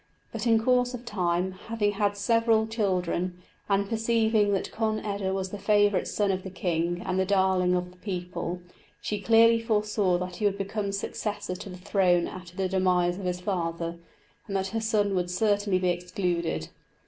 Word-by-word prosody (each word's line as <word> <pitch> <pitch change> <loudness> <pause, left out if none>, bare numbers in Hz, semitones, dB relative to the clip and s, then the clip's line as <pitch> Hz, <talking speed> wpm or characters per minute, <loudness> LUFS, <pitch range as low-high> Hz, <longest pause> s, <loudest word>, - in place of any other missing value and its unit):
But, - - -3
in 225 -1 +5
course 250 +1 +2
of 245 0 -9
time, 180 -4 0 0.2
having 225 -2 +1
had 205 0 0
several 230 +1 +3
children, 185 -5 -1 0.3
and 200 0 +2
perceiving 220 -1 +2
that 195 - -1
Conn 220 -1 0
eda 200 -2 -2
was 190 -1 -2
the 205 - -6
favourite 205 -1 +3
son 205 -2 +1
of 190 0 -2
the 190 - -7
king 175 -1 -1
and 185 - 0
the - - +3
darling 190 -2 +2
of 180 0 -2
the 180 - -20
people, 180 -2 -4 0.4
she 210 -1 -3
clearly 230 +1 +5
foresaw 210 -4 +1
that 180 0 -5
he 210 - -1
would 200 -1 +2
become 200 +1 -2
successor 205 0 -3
to 185 +2 -8
the 180 - -8
throne 180 -2 +2
after 180 -1 -10
the 190 -1 +1
demise 180 -1 +1
of 195 - -6
his 180 0 -2
father, 170 -3 -2 0.5
and 195 - -4
that 190 0 0
her 225 +3 -2
son 210 -3 +1
would 180 -1 0
certainly 205 0 +1
be 180 0 +1
excluded. 175 -1 -2
195 Hz, 185 wpm, -27 LUFS, 180-210 Hz, 0.5 s, in